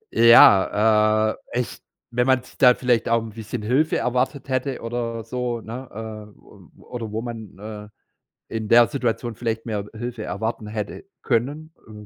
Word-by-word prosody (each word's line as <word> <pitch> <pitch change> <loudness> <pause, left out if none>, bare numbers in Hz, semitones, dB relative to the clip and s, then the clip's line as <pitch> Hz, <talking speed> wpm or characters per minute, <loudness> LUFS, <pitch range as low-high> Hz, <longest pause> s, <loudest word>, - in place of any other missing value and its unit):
Ja, 110 -1 +6 0.2
äh, 120 - 0
echt, 125 - -4 0.3
wenn 125 +1 +1
man 130 -1 +3
s 130 - -18
da 125 -2 +7
vielleicht 125 -3 +1
auch 115 -1 +2
'n 115 - -8
bisschen 110 +1 -6
Hilfe 135 +8 +2
erwartet 125 +3 -1
hätte 130 0 -2
oder 115 -1 -4
so, 120 +1 -3
ne, 125 +4 -8 0.5
äh, - - -25
o - - -18
oder 115 -3 -7
wo 110 +1 -3
man, 115 -5 -8
äh, 105 0 -9 0.7
in 110 -1 -3
der 120 0 +7
Situation 120 -3 -2
vielleicht 115 0 -3
mehr 105 -3 -3
Hilfe 120 0 -5
erwarten 110 -1 -4
hätte 105 -1 -5 0.2
können, 145 +7 -1 0.2
äh, 105 -1 -11
115 Hz, 165 wpm, -23 LUFS, 110-125 Hz, 0.7 s, da